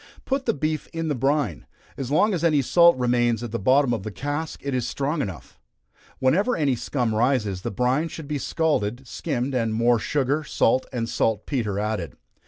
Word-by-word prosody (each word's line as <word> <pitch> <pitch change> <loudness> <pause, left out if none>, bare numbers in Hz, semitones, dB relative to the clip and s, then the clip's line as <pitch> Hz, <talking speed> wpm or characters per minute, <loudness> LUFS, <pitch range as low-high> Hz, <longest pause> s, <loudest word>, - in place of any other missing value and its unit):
Put 270 0 -1
the - - +3
beef 155 +2 -2
in 165 -1 -2
the - - +1
brine. 135 - 0 0.3
As 135 -2 -5
long 205 +9 +3
as 170 -3 -2
any 155 -4 +3
salt 170 +3 +5
remains 120 -2 +1
at 120 - -5
the 115 - -2
bottom 130 +4 +3
of 110 - -2
the 110 - -5
cask 145 - -4
it 140 -1 -2
is 125 -2 -1
strong 145 +3 -1
enough. 95 -9 -7 0.6
Whenever 185 - +2
any 140 -5 +2
scum 120 -1 -1
rises, 110 -5 +1
the - - -3
brine 125 - +1
should 160 -2 -8
be 150 -1 -2
scalded, 130 -6 -1
skimmed, 125 +3 -3
and 115 -3 0
more 120 +1 +3
sugar, 145 +4 0
salt 130 -2 +1
and 120 -3 -2
salt 110 -2 0
petre 110 -8 -2
added. 105 - -3
130 Hz, 190 wpm, -24 LUFS, 115-150 Hz, 0.6 s, salt